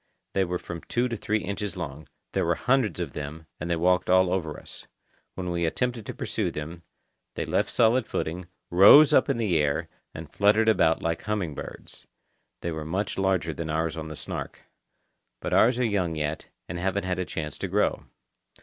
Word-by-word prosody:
They 95 Hz, -, +2 dB
were 90 Hz, 0 st, -2 dB
from 85 Hz, -1 st, -7 dB
two 120 Hz, +1 st, 0 dB
to 115 Hz, -, -2 dB
three 110 Hz, 0 st, -1 dB
inches 100 Hz, -1 st, -4 dB
long; 75 Hz, -3 st, -6 dB, 0.2 s
there -, -, 0 dB
were -, -, +1 dB
hundreds 125 Hz, -, +1 dB
of -, -, -4 dB
them, 75 Hz, +2 st, -6 dB
and 85 Hz, -, -4 dB
they 85 Hz, -, +2 dB
walked 90 Hz, +2 st, +2 dB
all 95 Hz, 0 st, +4 dB
over 80 Hz, -5 st, -2 dB
us. -, -, -12 dB, 0.5 s
When 90 Hz, -2 st, -3 dB
we 85 Hz, 0 st, -1 dB
attempted 115 Hz, +7 st, -1 dB
to -, -, -4 dB
pursue -, -, -2 dB
them, 80 Hz, +3 st, -6 dB, 0.5 s
they -, -, -2 dB
left -, -, 0 dB
solid 115 Hz, +1 st, +3 dB
footing, 85 Hz, +3 st, -3 dB, 0.2 s
rose 100 Hz, +12 st, +8 dB
up 130 Hz, -, +4 dB
in 135 Hz, -, +1 dB
the 100 Hz, -8 st, +1 dB
air, 75 Hz, +3 st, 0 dB, 0.3 s
and -, -, -9 dB
fluttered 105 Hz, +2 st, +4 dB
about 90 Hz, -6 st, +3 dB
like 85 Hz, 0 st, -1 dB
humming 105 Hz, -7 st, -2 dB
birds. -, -, -9 dB, 0.5 s
They 85 Hz, -, -2 dB
were 80 Hz, -1 st, -4 dB
much 95 Hz, +5 st, -2 dB
larger 95 Hz, -4 st, +1 dB
than 80 Hz, 0 st, -5 dB
ours 80 Hz, +1 st, -1 dB
on 80 Hz, -1 st, -5 dB
the 80 Hz, -, -7 dB
Snark. -, -, -6 dB, 0.8 s
But -, -, -3 dB
ours 120 Hz, +2 st, +5 dB
are 125 Hz, -, +1 dB
young 95 Hz, -7 st, 0 dB
yet, 75 Hz, 0 st, -3 dB, 0.2 s
and 85 Hz, +1 st, -5 dB
haven't 95 Hz, +2 st, -1 dB
had 90 Hz, 0 st, -1 dB
a -, -, +1 dB
chance 75 Hz, -2 st, -5 dB
to -, -, -2 dB
grow. -, -, 0 dB
90 Hz, 195 wpm, -26 LUFS, 80-105 Hz, 0.8 s, rose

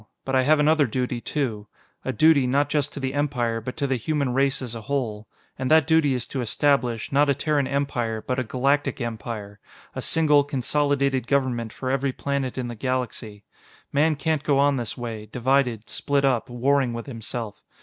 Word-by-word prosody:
But 135 Hz, -, -3 dB
I 130 Hz, -, +5 dB
have 150 Hz, +4 st, +4 dB
another 150 Hz, -1 st, +4 dB
duty, 125 Hz, 0 st, -2 dB
too. 115 Hz, -9 st, -3 dB, 0.4 s
A 130 Hz, -, -1 dB
duty, 155 Hz, -2 st, +4 dB
not 140 Hz, +3 st, +2 dB
just 145 Hz, -3 st, 0 dB
to -, -, -6 dB
the 130 Hz, -1 st, -2 dB
Empire, 125 Hz, -6 st, -1 dB
but 125 Hz, +3 st, -6 dB
to 145 Hz, -, 0 dB
the 135 Hz, -2 st, 0 dB
human 140 Hz, +1 st, -1 dB
race 135 Hz, +1 st, +2 dB
as 125 Hz, -3 st, -5 dB
a 115 Hz, -, -6 dB
whole. 110 Hz, -4 st, -3 dB, 0.3 s
And 130 Hz, -1 st, -1 dB
that 155 Hz, -2 st, +5 dB
duty 160 Hz, -4 st, +3 dB
is 120 Hz, -1 st, -1 dB
to 135 Hz, -, -3 dB
establish, 120 Hz, -1 st, +1 dB
not 145 Hz, +1 st, +3 dB
a 140 Hz, -, +3 dB
Terran 145 Hz, -1 st, 0 dB
Empire, 120 Hz, -6 st, -2 dB
but 130 Hz, 0 st, -1 dB
a -, -, 0 dB
Galactic 135 Hz, +6 st, 0 dB
Empire 110 Hz, -3 st, -5 dB, 0.4 s
a -, -, -3 dB
single, 150 Hz, -3 st, +3 dB
consolidated 140 Hz, -1 st, 0 dB
government 125 Hz, -5 st, 0 dB
for 130 Hz, +3 st, -4 dB
every 135 Hz, 0 st, 0 dB
planet 140 Hz, -2 st, -2 dB
in 125 Hz, -1 st, -2 dB
the 120 Hz, -, -5 dB
galaxy. 115 Hz, -3 st, -4 dB, 0.5 s
Man 155 Hz, +2 st, +3 dB
can't 155 Hz, +1 st, 0 dB
go 145 Hz, -2 st, +2 dB
on 140 Hz, 0 st, +4 dB
this 120 Hz, -4 st, -4 dB
way, 115 Hz, -3 st, -6 dB
divided, 125 Hz, -1 st, 0 dB
split 140 Hz, -1 st, 0 dB
up, 130 Hz, -2 st, +1 dB
warring 130 Hz, +1 st, +1 dB
with 115 Hz, 0 st, -5 dB
himself. 115 Hz, -3 st, -6 dB
130 Hz, 190 wpm, -24 LUFS, 120-140 Hz, 0.5 s, I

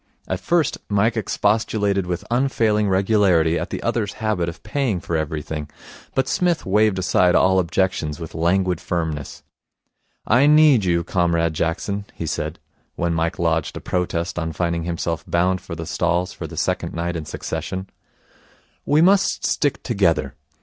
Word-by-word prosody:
At 95 Hz, -, -2 dB
first 160 Hz, -, +1 dB
Mike 105 Hz, +3 st, +2 dB
expostulated 105 Hz, -2 st, 0 dB
with 90 Hz, +3 st, -3 dB
unfailing 115 Hz, -5 st, +2 dB
regularity 95 Hz, -4 st, +3 dB
at -, -, -4 dB
the -, -, -5 dB
other's 105 Hz, -4 st, -1 dB
habit 105 Hz, -6 st, -1 dB
of 85 Hz, -, -11 dB
paying 110 Hz, -3 st, -1 dB
for 85 Hz, -, -4 dB
everything, 80 Hz, -1 st, -3 dB, 0.5 s
but 130 Hz, -, +1 dB
Psmith 175 Hz, -2 st, 0 dB
waved 105 Hz, 0 st, +3 dB
aside 90 Hz, -1 st, +3 dB
all 95 Hz, 0 st, +4 dB
objections 90 Hz, -3 st, -1 dB
with 80 Hz, -2 st, -7 dB
languid 90 Hz, +1 st, +1 dB
firmness. 80 Hz, -5 st, -3 dB, 0.8 s
'I 125 Hz, +6 st, +4 dB
need 150 Hz, -8 st, +6 dB
you, 85 Hz, -1 st, +2 dB
Comrade 85 Hz, -2 st, +1 dB
Jackson,' 95 Hz, +6 st, -2 dB
he 85 Hz, -, -4 dB
said, -, -, -3 dB, 0.4 s
when 85 Hz, 0 st, -1 dB
Mike 85 Hz, +3 st, -1 dB
lodged 80 Hz, -3 st, 0 dB
a -, -, -4 dB
protest 90 Hz, -1 st, -2 dB
on 80 Hz, -1 st, -3 dB
finding 85 Hz, 0 st, -1 dB
himself 85 Hz, -1 st, -2 dB
bound 90 Hz, +2 st, +1 dB
for 85 Hz, -, -7 dB
the 80 Hz, +1 st, -6 dB
stalls 85 Hz, +2 st, 0 dB
for -, -, -6 dB
the -, -, -10 dB
second -, -, -1 dB
night 85 Hz, +1 st, -2 dB
in 80 Hz, -2 st, -4 dB
succession. 95 Hz, +5 st, -5 dB, 1.0 s
'We 150 Hz, +3 st, +4 dB
must 195 Hz, +2 st, +3 dB
stick 145 Hz, -2 st, 0 dB
together. 85 Hz, -, +1 dB
90 Hz, 155 wpm, -22 LUFS, 85-105 Hz, 1.0 s, need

